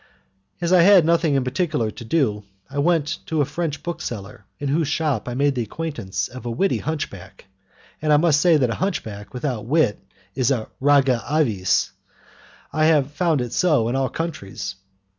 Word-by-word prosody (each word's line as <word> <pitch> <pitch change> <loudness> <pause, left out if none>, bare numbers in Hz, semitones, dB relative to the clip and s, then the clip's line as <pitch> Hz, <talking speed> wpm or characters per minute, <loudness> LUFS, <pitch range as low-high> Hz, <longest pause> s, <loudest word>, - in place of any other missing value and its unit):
As 175 +1 +1
I 180 - +7
had 185 -2 +7
nothing 165 -4 +3
particular 130 -4 -1
to - - -10
do, 110 -6 0 0.3
I 145 - -3
went 165 +1 +1
to 160 - -1
a 145 - +3
French 155 -1 -4
bookseller 120 - -6
in 145 - -3
whose 155 +2 +1
shop 145 -6 -1
I 120 - -4
made 140 +2 +2
the 125 - -2
acquaintance 110 -7 -4
of 130 +1 -10
a 120 - -4
witty 190 +12 0
hunchback, 120 - -6 0.6
and 155 0 +1
I 150 - +6
must 150 -2 +3
say 170 -3 +5
that 125 -5 +1
a 115 - -5
hunchback 110 - -3
without 125 -4 -3
wit 150 -6 +2 0.3
is 130 +2 +1
a 120 -6 -1
rara 135 -3 +3
avis; 115 - +1 0.8
I 155 0 +2
have 150 -3 +3
found 160 -2 +1
it 120 -1 -4
so 150 -11 +2
in 125 - -1
all 135 -1 0
countries. 100 - -5
145 Hz, 180 wpm, -22 LUFS, 120-160 Hz, 0.8 s, I